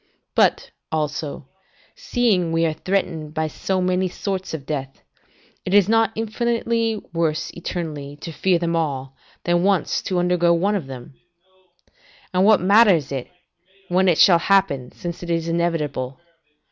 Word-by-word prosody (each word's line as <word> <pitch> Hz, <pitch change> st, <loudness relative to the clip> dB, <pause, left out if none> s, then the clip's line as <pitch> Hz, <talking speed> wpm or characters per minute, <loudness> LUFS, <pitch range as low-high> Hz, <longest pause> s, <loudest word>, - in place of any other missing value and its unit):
but, -, -, +2 dB, 0.2 s
also, 150 Hz, -2 st, -3 dB, 0.5 s
seeing 235 Hz, -, +1 dB
we 165 Hz, 0 st, +2 dB
are 160 Hz, -, 0 dB
threatened 160 Hz, -4 st, -2 dB
by 160 Hz, 0 st, 0 dB
so 185 Hz, +5 st, -2 dB
many 185 Hz, 0 st, +1 dB
sorts 190 Hz, +1 st, -4 dB
of 150 Hz, -4 st, -6 dB
death, 135 Hz, -3 st, -5 dB, 0.6 s
is 195 Hz, +1 st, +4 dB
it 210 Hz, -, -1 dB
not 225 Hz, -2 st, +3 dB
infinitely 230 Hz, 0 st, -1 dB
worse 165 Hz, -2 st, -1 dB
eternally 155 Hz, -5 st, -5 dB
to 165 Hz, -, -7 dB
fear 180 Hz, +3 st, +1 dB
them 170 Hz, 0 st, -1 dB
all, 135 Hz, -5 st, -2 dB, 0.3 s
than 175 Hz, 0 st, +2 dB
once 195 Hz, -2 st, +1 dB
to 185 Hz, -, -2 dB
undergo 175 Hz, -1 st, +2 dB
one 195 Hz, +5 st, +1 dB
of 180 Hz, -9 st, -2 dB
them? 130 Hz, -1 st, -9 dB, 1.2 s
And 185 Hz, +1 st, +3 dB
what 215 Hz, 0 st, +6 dB
matters 190 Hz, -, +4 dB
it, 135 Hz, -3 st, -4 dB, 0.6 s
when 185 Hz, +2 st, +3 dB
it 170 Hz, -3 st, +4 dB
shall 175 Hz, -3 st, +6 dB
happen, 170 Hz, -10 st, +1 dB
since 175 Hz, -1 st, -7 dB
it 175 Hz, -, -7 dB
is 165 Hz, -1 st, -1 dB
inevitable? 155 Hz, -6 st, -2 dB
175 Hz, 145 wpm, -22 LUFS, 155-195 Hz, 1.2 s, what